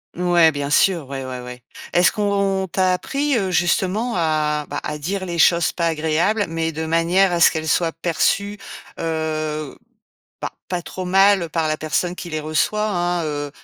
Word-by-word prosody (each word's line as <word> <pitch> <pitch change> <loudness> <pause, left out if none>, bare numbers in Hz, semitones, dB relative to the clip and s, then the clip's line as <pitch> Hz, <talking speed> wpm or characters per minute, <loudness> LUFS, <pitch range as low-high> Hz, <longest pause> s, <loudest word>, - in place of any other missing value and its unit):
Ouais 175 -2 +4
bien 145 -1 -4
sûr, 165 0 +2
ouais, 135 -1 -5
ouais, 130 -1 -6
ouais. 125 0 -10 0.3
Est-ce 175 +1 +4
qu'on 200 -2 0
on - - -11
t'a 185 +1 +1
appris, 275 +9 -1
heu, 195 -5 0
justement 185 +7 +1
à, 155 -3 0
bah, 145 - -3
à 150 0 -4
dire 190 +5 -3
les 170 -2 -4
choses 170 +1 +4
pas 170 -1 -1
agréables, 165 +7 +1
mais 165 0 -2
de 160 +1 -4
manière 170 +4 +2
à 175 - 0
ce - - +7
qu'elles 160 -1 -4
soient 165 +1 +1
perçues, 200 +5 0 0.4
heu, 155 -2 -3 0.7
bah, - - -3 0.2
pas 180 -1 -2
trop 185 +1 -7
mal 195 -2 +4
par 160 -1 -1
la 155 - -1
personne 155 +4 -1
qui 175 - -7
les 155 -1 -3
reçoit, 155 +8 0
hein, 175 -4 -1
heu 145 -1 -3
170 Hz, 185 wpm, -21 LUFS, 155-190 Hz, 0.7 s, ce